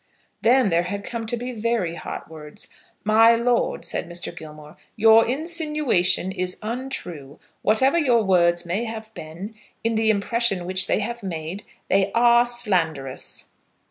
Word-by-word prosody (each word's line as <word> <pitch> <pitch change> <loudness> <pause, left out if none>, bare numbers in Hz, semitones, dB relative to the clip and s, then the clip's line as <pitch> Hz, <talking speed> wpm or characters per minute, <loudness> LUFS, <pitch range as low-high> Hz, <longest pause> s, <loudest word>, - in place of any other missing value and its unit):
Then 235 -2 +4
there 170 +1 +2
had 200 0 -4
come 230 0 -5
to 240 - -1
be 245 +2 -5
very 225 -6 -1
hot 170 - -7
words. 150 -2 -10 0.4
"My 225 +2 +5
lord," 235 +1 0
said - - -3
Mr. 175 0 -6
Gilmore, 155 -1 -11 0.2
"your 225 +1 +6
insinuation 300 - +1
is 180 -1 -3
untrue. 210 - -5 0.2
Whatever 260 +10 +3
your 245 -7 +3
words 175 -2 +2
may 190 +7 -2
have 220 -1 -7
been, 175 +7 -8 0.3
in 230 0 +1
the 220 0 +1
impression 210 -2 0
which 185 +1 0
they - - +1
have 235 +3 -4
made, 175 0 -5 0.2
they 195 0 +2
are 235 +1 +5
slanderous." 170 - -2
215 Hz, 145 wpm, -23 LUFS, 175-235 Hz, 0.4 s, your